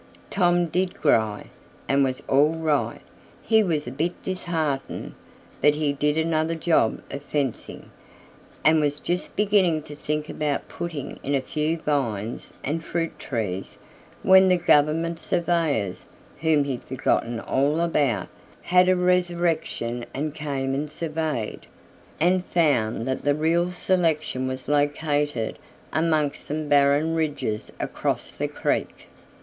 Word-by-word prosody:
Tom 175 -2 +3
did 180 +2 -1
"gry" 110 -8 +2 0.4
and 140 0 +3
was 130 -1 -2
all 145 +4 +4
right. 155 -3 0 0.4
He 220 -1 +4
was 160 -7 0
a - - -5
bit 165 +6 -1
disheartened, 160 -7 -3 0.5
but 150 - +5
he 150 -2 0
did 150 +2 0
another 160 0 +1
job 160 -8 +1
of 140 - -5
fencing, 140 -4 -3 0.7
and 155 0 +6
was 145 0 0
just 180 +1 -3
beginning 195 -7 +3
to 150 - -9
think 150 +1 -3
about 150 -2 -2
"puttin' 160 -5 -6
in 140 - -1
a - - +3
few 155 +4 -1
vines 120 -8 -2
an' 150 +4 -1
fruit 165 0 -3
trees" 100 -7 -4 0.5
when 190 0 +7
the 180 -1 +4
government 165 +1 +2
surveyors 160 - 0 0.3
whom 160 -2 +3
he'd 135 -3 -3
forgotten 120 -2 0
all 140 +6 +1
about 145 - +1 0.4
had 180 +1 +4
a 185 - +5
resurrection 175 -9 0
and 150 +2 -2
came 140 -3 -2
and 145 +2 -2
surveyed, 155 -7 -3 0.5
and 180 +3 +3
found 120 -10 +1
that 130 +1 -2
the 145 0 +2
real 170 +3 +1
selection 160 -8 0
was 130 0 -5
located 145 -3 0 0.3
amongst 155 -3 +1
some 155 +1 -3
barren 145 +2 +4
ridges 145 -9 -2
across - - -2
the - - -3
creek. - - -2
150 Hz, 135 wpm, -24 LUFS, 140-165 Hz, 0.7 s, when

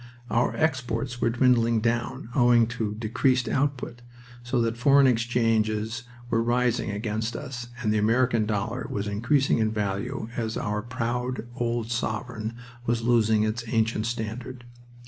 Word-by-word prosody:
Our 120 +1 +2
exports 125 -4 -1
were 115 - +3
dwindling 115 -1 +3
down, 115 0 -1
owing 120 -2 +5
to 110 -3 -3
decreased 125 +3 +1
output, 130 -2 -1 0.4
so 120 +1 -1
that 115 0 0
foreign 140 +3 +5
exchanges 115 -2 +1 0.3
were 115 - +3
rising 120 -1 +1
against 110 +2 -2
us 125 -2 -6 0.2
and 105 -1 +2
the 110 - +2
American 115 0 +2
dollar 110 +4 -2
was 100 0 -2
increasing 115 +7 +2
in 110 -1 +2
value 110 +4 -2
as 115 -1 -2
our 105 0 -1
proud 125 +1 -3
old 120 -2 -2
sovereign 115 -1 -3 0.3
was 115 0 +1
losing 110 -2 +3
its 110 +2 -1
ancient 110 -1 +1
standard. 120 +2 -5
115 Hz, 140 wpm, -26 LUFS, 110-125 Hz, 0.4 s, owing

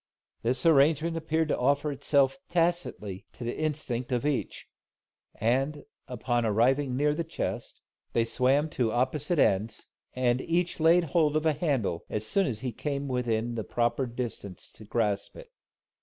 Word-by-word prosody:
This 125 +4 -1
arrangement 160 +1 +4
appeared 160 0 0
to - - +1
offer 140 +3 +2
itself 140 +1 +2
tacitly 165 - -1
to - - -9
the 120 - -3
Instinct 135 -5 -2
of 125 +2 0
each; 150 -4 -2 0.7
and, 135 +6 0 0.2
on 120 0 -1
arriving 125 +5 +2
near 145 +1 +2
the 170 +3 -2
chest, 165 - -5 0.3
they 115 - +2
swam 135 +6 +2
to 120 -6 0
opposite 130 +8 0
ends, 105 -3 +1 0.3
and 125 0 +1
each 175 +1 -1
laid 165 +2 +5
hold 155 -3 +3
of 155 +1 +1
a 160 - +4
handle, 135 - -1
as 105 0 -2
soon 195 - +2
as 115 -4 -3
he 130 - -2
came 140 +4 -3
within 120 -2 -1
the 115 -2 -3
proper 120 +5 0
distance 115 -6 -6
to 110 - -12
grasp 105 -2 -1
it. - - -12
130 Hz, 155 wpm, -28 LUFS, 120-155 Hz, 0.7 s, laid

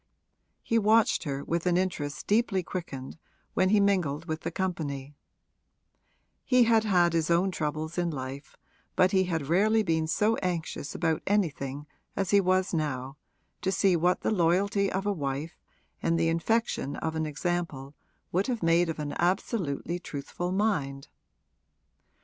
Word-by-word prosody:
He 230 - +2
watched 220 -2 +3
her 140 -1 -3
with 170 +1 -1
an 175 -1 +3
interest 165 -6 -2
deeply 205 -3 +2
quickened 160 -5 -6 0.3
when 185 0 +2
he 210 +1 +4
mingled 175 -7 +1
with 160 -1 -4
the 165 - -3
company; 155 -7 -3 1.3
he 250 -1 +4
had 225 -1 +4
had 175 -4 +3
his 165 -1 +1
own 175 +3 +3
troubles 155 +1 -3
in 175 -1 +1
life, 135 -1 -7 0.4
but 185 +1 +4
he 190 -2 +3
had 165 -5 -2
rarely 215 +8 +3
been 160 -3 0
so 210 +8 +2
anxious 170 -5 -3
about 160 -2 0
anything 150 -8 -1 0.3
as 195 -3 -1
he 200 -1 +6
was 185 0 +1
now 140 -4 -2 0.4
to 190 - 0
see 190 -1 +3
what 175 +2 +2
the - - 0
loyalty 195 +2 +2
of 190 +1 -2
a 205 - +1
wife 145 -1 -4 0.4
and 165 0 +1
the 165 0 +2
infection 170 -3 0
of 160 0 -3
an 160 -1 -1
example 150 -3 -3 0.4
would 185 +3 +1
have 240 -6 -2
made 165 +1 +3
of 160 - -3
an 150 -1 -4
absolutely 175 - -1
truthful 175 +3 -5
mind. 150 -10 -1
170 Hz, 155 wpm, -28 LUFS, 155-190 Hz, 1.3 s, he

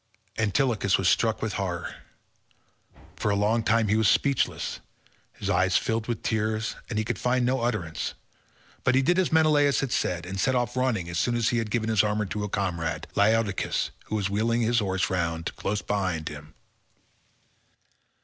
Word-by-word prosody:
Antilochus 110 -2 +2
was 95 - 0
struck 110 +3 +2
with 110 - -2
horror. 90 -3 -3 1.2
For - - -1
a 100 - +2
long 105 +3 +2
time 110 0 +2
he 105 - +2
was 110 -1 +3
speechless; 140 -2 +1 0.5
his - - -6
eyes 95 0 +3
filled 115 -1 -1
with 120 -2 -3
tears 110 0 -1
and 115 - -3
he 110 - 0
could 120 - -3
find 125 0 +1
no 130 +1 +1
utterance, 105 -10 -2 0.7
but 130 - +3
he 135 - +4
did 175 +5 +3
as 185 - +1
Menelaus 150 -3 +4
had 135 -3 -2
said, 90 -7 -1
and 95 +1 -5
set 130 +3 +2
off 120 0 0
running 125 -9 0
as 85 0 -2
soon 120 - +1
as 115 -1 +2
he 120 - +1
had 110 -1 -3
given 110 0 -1
his 110 -3 +4
armour 105 0 0
to 105 +2 -4
a 105 - -3
comrade, 85 -5 -2
Laodocus, 105 -1 +1
who - - -4
was 100 -2 0
wheeling 115 +4 0
his 115 +1 +2
horses 95 -3 -1
round, 85 -2 -2
close 105 0 -2
beside 90 -6 -1
him. 75 +1 -11
110 Hz, 180 wpm, -26 LUFS, 95-120 Hz, 1.2 s, he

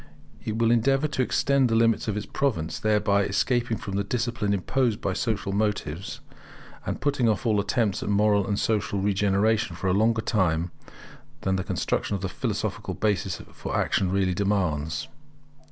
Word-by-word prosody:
It 110 0 -3
will 115 0 +3
endeavour 135 +5 +3
to 140 - -1
extend 135 0 +2
the 115 - +2
limits 115 0 +3
of 105 -1 -1
its 105 - -3
province; 85 - -1
thereby 105 -2 +2
escaping 115 +4 0
from 100 -1 -4
the 100 - +1
discipline 115 -1 -1
imposed 110 +3 0
by 95 - -1
social 105 -2 -1
motives, 100 -5 -2 0.7
and - - -2
putting 140 -5 +1
off 110 +4 -1
all 110 -3 +3
attempts 105 -1 0
at - - -3
moral 105 -1 +3
and 100 0 0
social 100 -2 0
regeneration 100 +2 +1
for - - -7
a - - +3
longer 110 +2 +2
time 85 -5 +1 0.7
than 95 0 0
the 95 - -1
construction 100 - -1
of 95 - -4
the 95 - -1
philosophic 105 -3 -3
basis 100 -5 0
for - - -3
action 95 - +1
really 95 -1 +1
demands. 80 -6 -1
105 Hz, 170 wpm, -26 LUFS, 95-115 Hz, 0.7 s, will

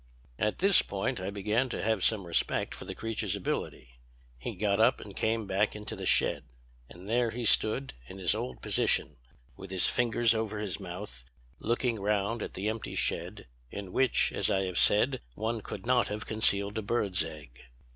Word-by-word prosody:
"At 105 - +1
this 195 +1 +5
point 100 -1 -2
I 95 +1 -3
began 105 +6 0
to - - -3
have 110 -3 +1
some 105 -4 +2
respect 85 - 0
for - - -7
the - - -6
creature's 110 -3 -2
ability. 60 -9 -4 0.4
He - - -5
got 100 +1 +1
up 120 +3 +4
and 100 -2 -10
came 110 0 0
back 100 +2 +1
into 105 -1 -5
the - - -4
shed. - - +2 0.4
And 90 +3 -12
there 120 +1 +2
he 120 +1 -4
stood, 110 +5 +3
in 95 - -9
his 90 -3 +2
old 65 -1 -5
position, 75 - +1 0.4
with 95 +6 -10
his 95 -1 +1
fingers 120 -1 +3
over 110 -1 -2
his 105 -2 -3
mouth, 90 -9 -7 0.4
looking 120 -1 0
round 105 +2 0
at - - -5
the 100 +3 -2
empty 110 +1 -3
shed, - - -1 0.2
in 100 +2 -7
which, 130 -2 +3
as - - +1
I 95 0 +2
have 90 -2 -1
said, 125 +5 +4
one 110 +1 -2
could 100 0 -7
not 125 0 +3
have 105 0 -4
concealed 100 -1 +1
a - - -2
bird's 100 -5 +1
egg. 70 -6 -10
105 Hz, 185 wpm, -30 LUFS, 95-115 Hz, 0.4 s, this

